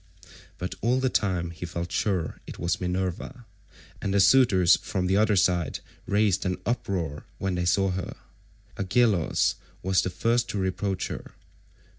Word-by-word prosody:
But 90 - -4
all 125 +3 +2
the 130 0 +1
time 90 -4 0
he 85 - -10
felt 85 +1 -5
sure 95 -7 -1
it - - -8
was 85 +1 -1
Minerva, 95 +7 -3 0.6
and 100 - -1
the 100 - +3
suitors 95 -4 +5
from 95 -2 -3
the 95 +1 +2
other 105 +1 +3
side 90 -3 +1 0.3
raised 100 -2 +2
an 90 -1 -1
uproar 95 - -2
when 95 -1 -2
they 90 -1 -1
saw 95 +2 +2
her. 90 0 -4 0.6
Agelaus 100 -2 +2 0.3
was 95 0 +3
the - - -2
first 115 +6 0
to - - -3
reproach 95 0 -1
her. - - -7
95 Hz, 155 wpm, -26 LUFS, 90-105 Hz, 0.6 s, suitors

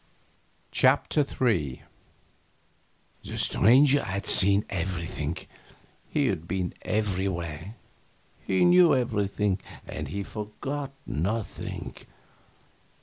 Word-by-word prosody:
CHAPTER - - +3
III 90 - -1 1.4
The - - -6
Stranger 135 +6 +4
had 100 0 -3
seen 100 +2 +4
everything, 85 -4 -3 0.7
he 145 -2 +1
had 85 -9 -1
been 90 0 -2
everywhere, 95 -3 -2 0.7
he 95 - +2
knew 175 -2 +6
everything, 105 -5 0 0.3
and - - -5
he 100 0 -4
forgot 135 +8 -5
nothing. 100 +8 -3
100 Hz, 85 wpm, -27 LUFS, 90-120 Hz, 1.4 s, knew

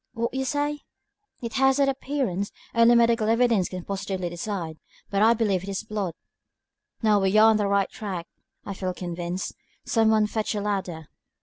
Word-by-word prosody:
"What 235 +1 -1 0.2
say 290 +1 0
you?" 295 - -7 0.6
"It 230 -1 -4
has 270 +1 +3
that 280 -1 +3
appearance. 265 -8 -2 0.2
Only 230 +1 +6
medical 230 -2 +3
evidence 230 -5 +3
can 180 -2 -7
positively 190 -2 -3
decide, 175 -3 -4 0.3
but 200 0 +1
I 225 +2 +6
believe 205 -5 +1
it 195 - -7
is 195 +1 -3
blood." 205 -6 -3 0.9
"Now 210 -2 +4
we 195 +2 +2
are 220 +1 +7
on 220 - +3
the 205 -1 0
right 200 0 +2
track, 185 -5 -5 0.4
I 200 - -4
feel 185 -1 -3
convinced. 175 +1 -4 0.3
Some 225 -1 +3
one 215 -1 +4
fetch 215 +1 -2
a 205 - -1
ladder." 190 -6 -3
210 Hz, 180 wpm, -25 LUFS, 190-230 Hz, 0.9 s, are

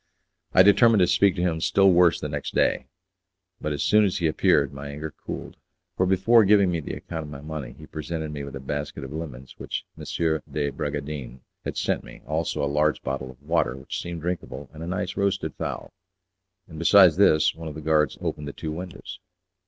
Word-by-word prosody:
I - - +9
determined 110 +1 +6
to - - +6
speak 95 +2 +3
to 90 - -1
him 80 -3 0
still 95 +2 +4
worse 85 -1 +4
the - - -3
next 70 -1 -5
day; - - +2 0.7
but 75 - -2
as 75 - -1
soon 105 0 +5
as 95 -3 +1
he 85 - -1
appeared 75 -2 +2
my 70 +1 -7
anger 75 +2 -6
cooled, - - -6 0.4
for 95 - +1
before 95 +5 +5
giving 100 -2 +4
me 85 - -1
the 75 - -5
account 80 -2 -6
of - - -9
my 70 -2 -8
money 75 -5 -6
he 75 - -11
presented 80 0 -5
me 70 -1 -5
with 70 -1 -7
a - - -5
basket 70 +1 -4
of 65 - -7
lemons 70 -5 -8
which - - -4
M. - - -10 0.5
de 70 -2 -1
Bragadin 70 -4 -5 0.2
had - - -5
sent - - 0
me, - - -13
also 80 0 -1
a - - +3
large 75 +2 +1
bottle 65 0 -3
of 65 +2 -15
water, 75 -5 0
which 65 - -5
seemed 85 -1 -6
drinkable, 85 -4 -5
and 80 - -10
a 85 - -5
nice 95 +1 -3
roasted 100 -1 0
fowl; - - -5 0.7
and, 80 -2 -10
besides 90 -1 +6
this, 80 -6 +4
one 80 0 -8
of 75 - -6
the - - -6
guards 75 -1 +2
opened 75 -1 -3
the 70 - -6
two 80 - -5
windows. 90 +3 -7
80 Hz, 210 wpm, -25 LUFS, 70-90 Hz, 0.7 s, I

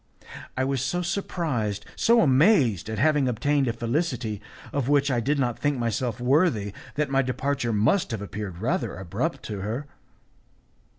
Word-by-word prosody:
I 130 - +2
was 135 -1 0
so 175 +7 -1
surprised, 150 - -2
so 230 0 +4
amazed 135 - +4
at 110 - -3
having 145 +2 +3
obtained 135 +4 +1
a 115 - 0
felicity 120 - -2 0.3
of 140 -2 -1
which 145 -1 +3
I 125 - +2
did 140 +6 0
not 125 -4 0
think 145 -1 +1
myself 120 0 -1
worthy, 125 - +2 0.2
that 150 -2 -1
my 135 0 +4
departure 130 -1 -1
must 115 - +2
have 115 -4 -4
appeared 100 -3 -6
rather 115 +1 -1
abrupt 90 -3 -3
to 105 -2 -5
her. 115 +8 -3
130 Hz, 160 wpm, -26 LUFS, 110-145 Hz, 0.3 s, so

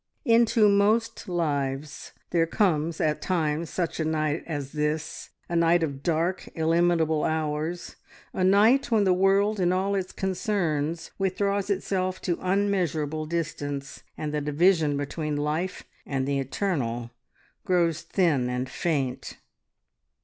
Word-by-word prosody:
Into 230 -2 +4
most 205 +2 +2
lives 145 -4 -2 0.2
there 165 -1 +2
comes 165 -4 +1
at 150 -1 0
times 160 -3 -1
such 170 -3 -3
a - - +1
night 155 0 -1
as 145 -4 -4
this; 150 0 -3 0.2
a 170 - -3
night 170 0 +4
of 140 -3 -3
dark, 170 +4 -1
illimitable 165 -1 +2
hours, 160 +2 -2 0.4
a 185 - -1
night 215 +9 +4
when 220 -3 +3
the 190 -2 +4
world 195 +3 +2
and 180 -1 +2
all 190 +2 0
its 190 -2 -2
concerns 175 -5 -2
withdraws 200 +1 0
itself 185 -1 -1
to 175 -2 -1
unmeasurable 175 -6 0
distance, 145 -4 -4 0.2
and 150 -1 -4
the 150 - 0
division 150 0 +2
between 150 +2 -3
life 155 +5 -2 0.2
and 135 -2 -2
the 140 -1 0
eternal 130 - -2 0.5
grows 170 -3 +1
thin 160 -7 +1
and 125 +1 -3
faint. 140 -8 -2
165 Hz, 130 wpm, -26 LUFS, 150-190 Hz, 0.5 s, Into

